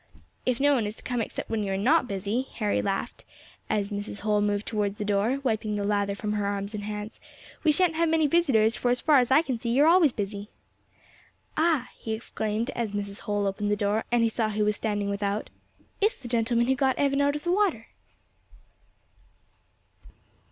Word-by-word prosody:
"If 250 -2 +1
no 285 +1 +4
one 235 -6 +1
is 210 - -5
to - - -11
come 245 -2 -1
except - - -5
when 220 -2 0
you 195 - -2
are - - -1
not 255 +7 +3
busy," 205 +5 -2
Harry 210 -3 0
laughed, 195 -1 -3 0.5
as 205 -1 -1
Mrs. 205 0 -5
Holl 210 0 +1
moved 205 0 0
towards 210 -2 -2
the 210 - -3
door, 210 +6 +1
wiping 220 -4 -1
the 205 - -2
lather 200 -1 0
from 210 +1 -3
her 205 -1 -1
arms 200 +1 -3
and 205 -1 -5
hands, 210 0 -6 0.4
"we 310 - +5
shan't 355 +1 +3
have 330 0 +1
many 320 -1 +3
visitors, 270 -9 +3
for 245 - -1
as 250 +1 +3
far 295 -1 +5
as 245 - +1
I 300 +5 +5
can 255 -7 -3
see 235 - -3
you 260 +5 +4
are - - +5
always 335 -4 +6
busy." 205 -1 -5 1.1
"Ah!" 315 -6 +2
he 220 - -5
exclaimed, 220 +1 -3
as 225 -4 -3
Mrs. 200 -1 -4
Holl 205 -1 -1
opened 200 +1 -1
the 205 - +2
door, 205 +2 0
and 240 -1 +3
he 230 - +3
saw 220 -1 -1
who 210 0 0
was 210 0 +1
standing 205 -2 -2
without, 200 +1 -2 0.5
"it's 440 +4 +2
the 245 - -8
gentleman 235 0 +1
who 265 - +2
got 265 0 +1
Evan 280 0 +2
out 285 +1 +2
of 295 - -5
the 345 - 0
water." 365 - +1
220 Hz, 210 wpm, -27 LUFS, 205-265 Hz, 1.1 s, always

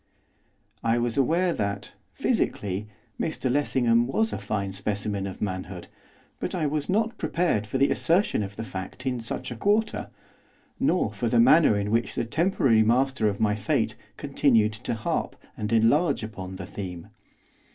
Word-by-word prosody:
I 115 +1 +2
was 120 -1 0
aware 170 +6 +2
that, 100 -4 -3 0.2
physically, 100 +1 -1 0.3
Mr 140 -5 -1
Lessingham 120 -4 +2
was 220 +11 0
a - - -3
fine 100 -1 -3
specimen 100 0 -2
of 95 - -6
manhood, 95 -2 -5 0.5
but - - -3
I 165 -4 0
was 145 +1 -1
not 220 +4 0
prepared 135 - 0
for 120 - -2
the 135 +1 +3
assertion 175 - +2
of 100 -1 -5
the 110 - -5
fact 95 +4 -7
in 125 -2 -1
such 125 +2 -5
a - - -4
quarter, 210 - 0 0.7
nor - - +1
for - - -1
the - - +3
manner 160 - +6
in 100 0 -2
which 115 +1 0
the - - -1
temporary 135 - +2
master 125 0 +2
of 100 - -4
my 105 -1 +2
fate 105 -1 0 0.2
continued 125 -6 +2
to 110 +1 -4
harp 110 - -2 0.2
and 105 +1 -4
enlarge 125 +6 +3
upon 95 -4 -7
the 95 -1 -7
theme. 90 -2 -7
115 Hz, 160 wpm, -26 LUFS, 100-140 Hz, 0.7 s, manner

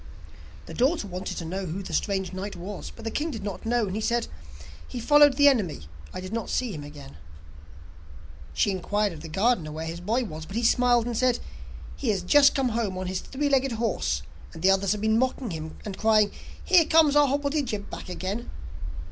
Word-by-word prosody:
The - - -9
daughter 260 -2 +1
wanted 185 0 -5
to 165 - -4
hear 190 +2 -3
who 180 +5 -4
the 180 - -7
strange 190 +2 -1
knight 195 +2 -5
was, 190 +3 -7
but 230 - -11
the 225 - -2
king 310 +3 -1
did 225 -9 -6
not 200 +2 -5
know, 240 -1 +2
and 205 +3 -3
said: 235 0 +1 0.6
'He 250 - -6
followed 290 +2 +6
the 285 0 +7
enemy, 210 - +3
and - - -12 0.3
I - - -6
did 185 +3 -7
not 230 -1 -3
see 250 -3 -1
him 150 -6 -6
again.' 145 - -11 1.3
She 205 - +1
inquired 205 +1 -1
of 155 - -10
the 165 - -8
gardener 190 -3 +1
where 160 +1 -5
his 165 +1 -5
boy 225 +8 0
was, 160 -7 -7
but 195 - -8
he 235 - 0
smiled, 240 0 +4
and 240 -1 -3
said: 250 +1 +2 0.6
'He 260 - -2
has 195 -4 0
just 280 +9 +6
come 270 -3 +1
home 220 -5 -2
on 185 - -3
his 185 0 -2
three 285 +7 -3
legged 270 -2 +2
horse, 230 0 -1 0.3
and 165 0 -10
the 190 - +6
others 195 0 +2
have 210 - -5
been 220 +1 +2
mocking 255 -3 -1
him, 160 -1 -6
and 200 -3 -6
crying: 215 -2 +4 0.3
"Here 350 -3 +6
comes 315 -2 +5
our 295 -1 +6
hobblety 285 +2 0
jib 210 -5 -4
back - - -7
again!" 190 +5 -4
215 Hz, 215 wpm, -26 LUFS, 185-250 Hz, 1.3 s, the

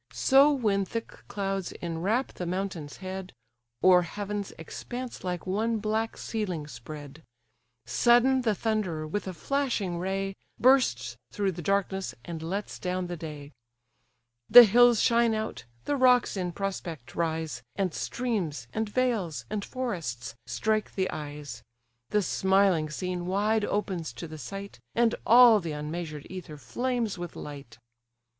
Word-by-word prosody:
So 275 +2 +5
when 210 -8 +1
thick 230 +4 -4 0.2
clouds 195 -2 -3
enwrap 180 +10 -1
the 180 - -5
mountain's 180 -5 -4
head, 185 0 -6 0.5
O'er 185 -1 +7
heaven's 205 +3 -4
expanse 245 +10 -7
like 180 -2 -3
one 220 +5 0
black 220 +1 -1
ceiling 185 -9 -3
spread; 145 +3 -9 0.6
Sudden 240 - +4
the 220 -4 +1
Thunderer, 195 -8 -1
with 200 +6 -3
a 185 - -3
flashing 230 - -1
ray, 195 +1 -2 0.2
Bursts 260 0 +3
through 200 -3 0
the 175 0 -7
darkness, 195 +1 -1
and 165 -2 -6
lets 195 +6 -4
down 180 0 -2
the 175 0 -4
day: 150 -3 -8 1.0
The 245 - +12
hills 240 +1 +5
shine 235 -1 +4
out, 220 0 -4 0.2
the 290 - +1
rocks 250 -4 +4
in 180 -2 -2
prospect 175 -8 -5
rise, 160 -1 -2
And 190 -4 -1
streams, 190 - -2
and 220 -1 -1
vales, 220 -9 0
and 210 -1 -2
forests, 165 - -4
strike 215 -1 -1
the 190 -1 0
eyes; 145 -5 -7 0.5
The 210 -1 +2
smiling 190 -5 +2
scene 180 +2 -3
wide 210 +3 +1
opens 185 - -2
to 115 +8 -7
the 155 0 -9
sight, 195 +5 -7 0.2
And 235 -1 +3
all 235 -2 +8
the 165 -5 -4
unmeasured 150 0 -5
ether 180 -5 -8
flames 240 - -2
with 175 -1 -6
light. 140 -5 -9
190 Hz, 140 wpm, -28 LUFS, 165-220 Hz, 1.0 s, The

